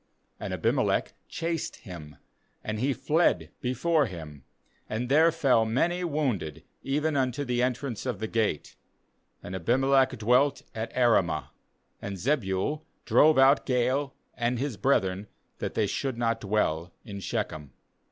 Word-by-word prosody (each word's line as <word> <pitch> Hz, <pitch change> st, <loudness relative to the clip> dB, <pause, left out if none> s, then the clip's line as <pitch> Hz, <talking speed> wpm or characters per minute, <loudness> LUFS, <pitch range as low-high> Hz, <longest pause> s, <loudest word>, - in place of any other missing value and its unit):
40 -, -, -6 dB
And -, -, -3 dB
Abimelech -, -, +1 dB
chased 165 Hz, -1 st, -3 dB
him, 80 Hz, -, -10 dB, 0.5 s
and 110 Hz, 0 st, -3 dB
he 135 Hz, +4 st, +1 dB
fled 135 Hz, -, +1 dB
before 150 Hz, +4 st, +1 dB
him, 80 Hz, -, -9 dB, 0.5 s
and 120 Hz, +3 st, -3 dB
there 160 Hz, +4 st, +5 dB
fell 135 Hz, -8 st, +3 dB
many 165 Hz, +11 st, 0 dB
wounded, 125 Hz, -, -2 dB, 0.2 s
even 150 Hz, +3 st, 0 dB
unto 130 Hz, +1 st, 0 dB
the 125 Hz, -1 st, 0 dB
entrance 125 Hz, -1 st, -2 dB
of 125 Hz, -5 st, -1 dB
the 110 Hz, -, -3 dB
gate. 110 Hz, -8 st, -1 dB, 0.7 s
^And 90 Hz, -, -6 dB
Abimeleeh 130 Hz, +8 st, +2 dB
dwelt 125 Hz, +6 st, +2 dB
at 110 Hz, +1 st, -4 dB
Arumah; 115 Hz, -9 st, +2 dB, 0.5 s
and 100 Hz, -1 st, -5 dB
Zebul 120 Hz, -, 0 dB, 0.2 s
drove 155 Hz, 0 st, +5 dB
out 135 Hz, +2 st, +5 dB
Gaal 130 Hz, +2 st, +1 dB, 0.2 s
and 120 Hz, +1 st, -1 dB
his 135 Hz, -1 st, -2 dB
brethren, 100 Hz, -4 st, +1 dB, 0.3 s
that -, -, -4 dB
they 110 Hz, -, +2 dB
should 130 Hz, +4 st, -2 dB
not 115 Hz, -1 st, 0 dB
dwell 90 Hz, -5 st, 0 dB
in 100 Hz, -3 st, -7 dB
Shechem. 75 Hz, -6 st, -4 dB
120 Hz, 140 wpm, -28 LUFS, 100-140 Hz, 0.7 s, there